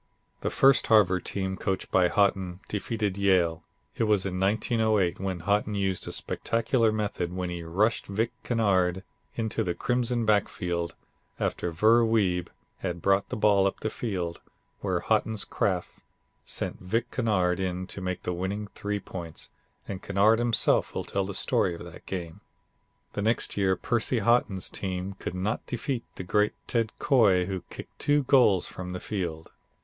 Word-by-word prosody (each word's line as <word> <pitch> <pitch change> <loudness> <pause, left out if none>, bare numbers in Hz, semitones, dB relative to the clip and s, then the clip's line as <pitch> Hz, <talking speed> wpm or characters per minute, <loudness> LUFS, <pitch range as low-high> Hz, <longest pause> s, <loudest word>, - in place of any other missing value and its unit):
The - - -1
first 135 0 +4
Harvard 95 -4 +4
team 95 -1 -2
coached 95 -1 -2
by 90 -2 +5
Haughton 95 -1 +1
defeated 105 -1 -2
Yale. 90 -5 +3 0.3
It 115 - +1
was 105 -3 +2
in 90 -1 -2
1908 105 -2 +2
when 95 -2 -3
Haughton 105 +3 +1
used 95 -2 -1
a - - -4
spectacular 115 0 0
method, 100 -5 -2
when 90 -1 -3
he 85 -1 -4
rushed 100 +8 0
Vic 110 +4 -1
Kennard 95 -6 +1 0.3
into 110 -1 -1
the 90 -3 -2
Crimson 120 -1 0
backfield 90 -5 0 0.4
after 90 - -1
Ver 110 +8 +5
Wiebe 95 -6 +2 0.3
had 90 -2 -3
brought 100 +3 +2
the - - -3
ball 100 -2 +4
up 95 - -3
the 110 - -2
field 90 -7 -3 0.4
where - - -1
Haughton's 110 -2 +1
craft 90 -3 -1 0.5
sent - - -3
Vic 115 +6 -2
Kennard 95 -7 +1
in 95 -1 -2
to 95 +1 -7
make 90 -1 -3
the 90 - -2
winning 100 +4 -3
three 105 0 -3
points 85 -4 -8 0.4
and 95 -1 -5
Kennard 100 +3 +3
himself 120 -1 +2
will - - -1
tell 100 -1 -1
the 100 0 -4
story 90 -1 +1
of 85 - -9
that 85 -1 -12
game. 85 -4 -5 0.7
The 100 - -2
next 110 +3 0
year 95 -2 +2
Percy 120 +3 0
Haughton's 110 -4 +2
team 95 0 -4
could 90 - -5
not 100 +5 -2
defeat 120 0 -2
the - - -6
great 105 +3 +2
Ted 115 -2 0
Coy, 105 -10 +4
who 95 -1 -3
kicked - - -10
two 145 0 +3
goals 125 -9 +4
from 90 -1 -6
the 90 - -4
field. 85 -7 -4
100 Hz, 165 wpm, -27 LUFS, 90-110 Hz, 0.7 s, by